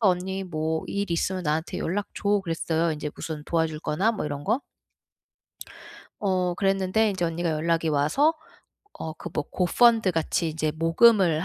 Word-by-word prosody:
언니 190 -1 +1
뭐 160 -2 -2
일 200 -2 -2
있으면 185 +2 -1
나한테 155 +1 -1
연락 200 +4 -2
줘." 205 0 +1
그랬어요. 165 -1 0
이제 150 0 -4
무슨 155 -2 -5
도와줄 160 -2 -1
거나 195 +10 +1
뭐 210 - -3
이런 145 -1 -5
거. 225 - +1 1.6
어 185 -3 0
그랬는데 195 +2 +1
이제 185 -2 -3
언니가 170 0 -1
연락이 165 +1 0
와서 155 - +2 0.7
어 160 - -5
그 170 - -8
뭐 150 - -1
고펀드 225 +3 +4
같이 165 0 0
이제 155 -1 -1
모금을 165 0 +4
170 Hz, 305 characters per minute, -25 LUFS, 160-195 Hz, 1.6 s, 고펀드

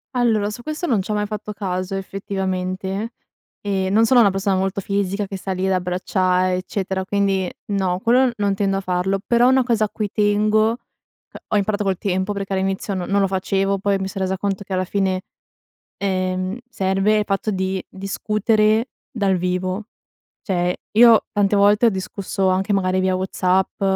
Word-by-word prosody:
Allora 220 -4 +2
su 240 - -8
questo 310 +6 -4
non 230 - +2
c'ho 210 +3 -2
mai 210 0 0
fatto 210 0 -5
caso 185 -2 -3
effettivamente. 190 +2 -3 0.5
Ehm, 190 -2 -1
non 225 +2 +4
sono 245 +1 +5
una 205 -4 +6
persona 195 0 0
molto 190 +1 -1
fisica 200 +1 -1
che 195 0 -6
sta 190 0 -4
lì 185 +1 -2
ad 190 - +2
abbracciare, 185 0 +1
eccetera, 190 0 -3
quindi 195 -1 0 0.2
no, 190 -2 0
quello 245 +3 +3
non 200 -1 +1
tendo 195 0 0
a 195 - -2
farlo 185 +1 0
però 240 +1 +4
una 260 0 +4
cosa 230 -3 +1
a - - -6
cui 210 -1 -3
tengo 215 +1 +3
uhm, 235 - -4 0.7
ho 210 - +1
imparato 205 +1 0
col 190 -2 0
tempo 190 +1 -1
perché 195 -1 -4
all'inizio 195 +1 -1
no 180 -2 -3
non 200 0 +2
lo 195 - +3
facevo, 195 +1 0
poi 200 0 +1
mi 190 0 -3
son 195 0 -5
resa 190 0 -1
conto 200 0 -2
che 190 -1 -6
alla 185 0 +1
fine, 190 -1 0 0.8
ehm, 185 +1 -1
serve 195 0 +1
il 210 - -1
fatto 195 +2 -1
di 190 -1 -1
discutere 215 +3 +1 0.2
dal 195 -5 +1
vivo. 185 +3 -2 0.6
Cioè, 180 -4 0 0.2
io 230 -1 +7
tante 205 0 +2
volte 205 +3 +4
ho - - +6
discusso 190 0 -2
anche 190 +2 +1
magari 185 -1 +1
via 185 0 +1
WhatsApp 185 0 0
195 Hz, 180 wpm, -21 LUFS, 190-210 Hz, 0.8 s, io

